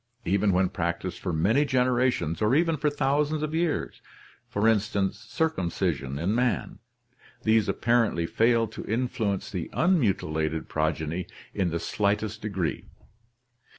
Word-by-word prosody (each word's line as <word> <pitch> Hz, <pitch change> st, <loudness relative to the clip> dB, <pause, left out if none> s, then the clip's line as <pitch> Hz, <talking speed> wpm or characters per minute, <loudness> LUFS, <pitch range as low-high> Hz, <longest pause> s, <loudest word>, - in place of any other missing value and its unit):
Even 100 Hz, +3 st, +2 dB
when 95 Hz, +1 st, +3 dB
practiced 85 Hz, +1 st, -3 dB
for 90 Hz, -, -3 dB
many 100 Hz, -, +3 dB
generations 125 Hz, -, +1 dB
or 110 Hz, +5 st, +3 dB
even 165 Hz, +1 st, +3 dB
for 150 Hz, 0 st, +1 dB
thousands 145 Hz, +2 st, 0 dB
of 155 Hz, 0 st, -3 dB
years 165 Hz, -1 st, -1 dB, 0.5 s
(circumcision 100 Hz, -, 0 dB
in 85 Hz, +7 st, 0 dB
man) 125 Hz, 0 st, 0 dB, 0.6 s
these 110 Hz, -2 st, +3 dB
apparently 115 Hz, -5 st, +2 dB
fail 115 Hz, +5 st, +3 dB
to -, -, -8 dB
influence 110 Hz, -4 st, -1 dB
the 90 Hz, -4 st, -4 dB
unmutilated 85 Hz, -, +1 dB
progeny 80 Hz, +2 st, -1 dB, 0.3 s
in 95 Hz, -3 st, 0 dB
the 85 Hz, 0 st, -2 dB
slightest 105 Hz, +3 st, -1 dB
degree. 95 Hz, -6 st, -3 dB
105 Hz, 120 wpm, -27 LUFS, 90-125 Hz, 0.6 s, when